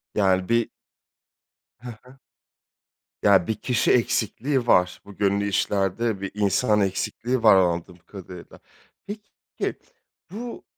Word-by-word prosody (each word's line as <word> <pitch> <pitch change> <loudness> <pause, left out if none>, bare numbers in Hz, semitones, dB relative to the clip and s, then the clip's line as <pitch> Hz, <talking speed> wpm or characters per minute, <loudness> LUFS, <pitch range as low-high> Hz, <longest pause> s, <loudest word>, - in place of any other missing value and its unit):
Yani, 95 -2 +2
bir 115 0 +2 1.1
Hı 125 0 -9
hı. 130 +2 -18 1.1
Ya, 95 -4 +4
bir 110 - -1
kişi 125 -2 0
eksikliği 120 +2 0
var. 90 -4 +3
Bu 100 -1 -13
gönüllü 100 0 +1
işlerde 100 +2 -1
bir 100 - -4
insan 105 +1 +2
eksikliği 115 +5 -2
var, 105 -3 +7
anladığım 85 -1 0
kadarıyla. 90 0 -12 0.5
Peki, 205 0 -6 0.6
bu 235 +4 -7
100 Hz, 110 wpm, -24 LUFS, 95-120 Hz, 1.1 s, var